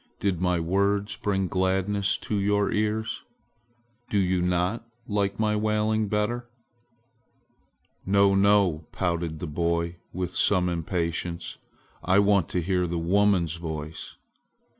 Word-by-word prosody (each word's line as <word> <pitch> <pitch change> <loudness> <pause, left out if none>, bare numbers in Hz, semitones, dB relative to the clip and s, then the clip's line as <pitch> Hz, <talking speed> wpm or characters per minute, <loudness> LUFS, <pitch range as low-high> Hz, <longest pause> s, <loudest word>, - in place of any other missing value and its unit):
Did 95 -4 -1
my 90 -1 +1
words 100 +4 0
bring 95 -2 -1
gladness 95 +2 +1
to 105 - -3
your 100 0 +1
ears? 110 +1 -1 0.9
Do 105 - 0
you 95 -2 +2
not 90 +5 0 0.2
like 100 -1 -1
my 105 -1 +2
wailing 110 0 +1
better?" 120 +4 -1 1.5
"No, 100 0 +4
no!" 95 -5 +3
pouted 85 -3 -2
the 85 - -5
boy 85 +2 -1
with 90 0 -4
some 90 -3 +3
impatience. 85 0 -3 0.4
"I 95 +2 +3
want 100 -3 +3
to 90 - -1
hear 90 0 0
the 85 0 -2
woman's 90 -1 +2
voice! 80 -2 -6
95 Hz, 120 wpm, -26 LUFS, 85-105 Hz, 1.5 s, No